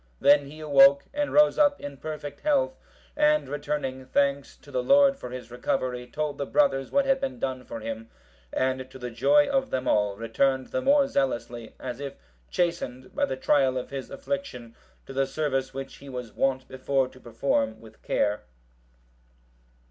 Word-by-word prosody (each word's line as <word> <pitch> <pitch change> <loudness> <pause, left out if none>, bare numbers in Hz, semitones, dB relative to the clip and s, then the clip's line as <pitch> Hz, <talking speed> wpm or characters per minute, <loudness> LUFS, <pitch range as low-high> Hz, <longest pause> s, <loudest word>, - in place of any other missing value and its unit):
Then 145 -1 +5
he 155 +2 -11
awoke, 140 -2 +6
and 290 0 -1
rose 300 +1 +5
up 290 -1 +4
in 145 -1 -7
perfect 145 -1 -6
health, - - +1 0.4
and 300 0 +3
returning 145 -3 -3
thanks 140 +1 0
to - - -16
the - - 0
Lord 280 - +5
for 270 - -8
his 125 -2 -8
recovery, 125 0 -2
told 150 0 -3
the 140 - -1
brothers 135 -9 +2
what 280 -1 +2
had 270 0 +2
been 265 -2 -3
done 130 - -3
for 115 - -7
him; 115 0 -6 0.4
and 130 0 -1
to 130 - -11
the 125 -1 -6
joy 290 - +4
of 270 -1 0
them 130 0 -2
all, 105 -1 +2
returned 130 +4 0
the 260 - -1
more 275 +1 +4
zealously, 120 - -2
as 125 -1 -6
if 140 -1 -6 0.3
chastened 130 -8 -2
by - - +1
the 130 - -4
trial 130 -1 +2
of 125 - -5
his 135 -2 -5
affliction, 275 - -5 0.3
to 135 - -9
the 135 0 +1
service 135 -4 -1
which 135 0 -7
he 140 - -12
was 125 -3 -6
wont 130 -1 0
before 130 0 0
to 130 - -16
perform 115 -2 -1
with 110 -1 -16
care. 105 0 0
135 Hz, 180 wpm, -26 LUFS, 125-175 Hz, 0.4 s, awoke